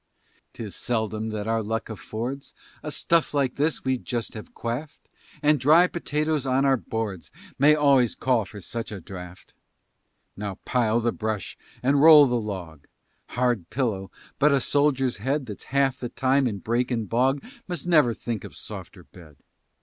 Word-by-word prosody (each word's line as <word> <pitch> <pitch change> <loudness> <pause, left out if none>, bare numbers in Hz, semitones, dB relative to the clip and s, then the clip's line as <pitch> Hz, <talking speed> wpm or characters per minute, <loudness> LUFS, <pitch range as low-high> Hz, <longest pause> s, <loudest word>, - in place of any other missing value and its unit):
'Tis 110 -4 -7
seldom 110 -2 -2
that 105 -1 -4
our 115 0 +1
luck 110 +1 -3
affords 120 +5 -6 0.3
A 150 - -5
stuff 165 0 +1
like 135 -3 +1
this 150 +3 0
we 130 -1 +1
just 120 -2 -4
have 110 - -10
quaffed, 130 +7 -5 0.4
And 150 0 +4
dry 155 +7 +6
potatoes 155 -4 -1
on 130 +1 +2
our 135 -1 +4
boards 110 -6 -4 0.3
May 150 +3 +6
always 140 -5 +3
call 125 -5 +1
for 105 0 -10
such 115 +5 -5
a 105 - -6
draught. 90 0 -10 0.8
Now 100 -1 -4
pile 120 -2 +1
the 120 +1 +1
brush 110 -3 -3 0.3
and 140 +2 +3
roll 155 -2 +9
the 120 -3 0
log; 90 -8 -7 0.5
Hard 120 -8 +1
pillow, 110 -8 -2 0.3
but 150 +2 +5
a 140 - +4
soldier's 135 -2 +1
head 135 +6 -1
That's 105 -4 -8
half 135 -1 +1
the 120 - -4
time 135 +1 +2
in 105 -4 -3
brake 120 +5 -1
and 115 -4 -2
bog 130 +5 +1 0.2
Must 175 -5 -3
never 150 -10 +4
think 115 -3 -4
of - - -10
softer - - -9
bed. 80 -5 -16
125 Hz, 165 wpm, -25 LUFS, 110-140 Hz, 0.8 s, roll